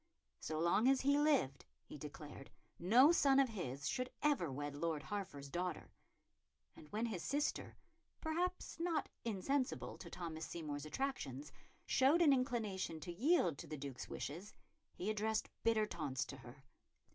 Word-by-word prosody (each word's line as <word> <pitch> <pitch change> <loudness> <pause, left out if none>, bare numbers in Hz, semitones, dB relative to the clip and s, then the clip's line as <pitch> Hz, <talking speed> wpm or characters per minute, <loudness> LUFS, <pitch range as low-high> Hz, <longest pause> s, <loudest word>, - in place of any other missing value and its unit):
So 155 - -3
long 170 +8 +4
as 270 0 +5
he 280 +2 +4
lived, 280 - +2 0.2
he - - -10
declared, 145 -1 -8 0.3
no 240 - +7
son 275 -5 +5
of 270 -2 +4
his 140 - -4
should 255 0 -1
ever 280 - +2
wed 145 +2 -4
Lord 155 0 -1
Hertford's 180 -10 -5
daughter; 180 0 -3 0.8
and 150 - -14
when 220 +3 0
his 210 -7 -3
sister 290 - -1 0.4
perhaps 350 +2 -2
not 335 -3 0
insensible 250 +5 -1
to 170 - -8
Thomas 165 -2 -5
Seymour's 150 -3 -4
attractions 150 - -3 0.3
showed 290 +7 +5
an 290 -4 +7
inclination 220 - -1
to 175 +1 -5
yield 220 - +3
to - - -7
the 155 - -5
Duke's 135 -2 -6
wishes, 175 +9 -5 0.4
he 185 - -4
addressed 220 +1 -1
bitter 225 -2 +3
taunts 135 -9 -2
to 140 - -8
her. 125 +1 -13
190 Hz, 150 wpm, -38 LUFS, -, 0.8 s, no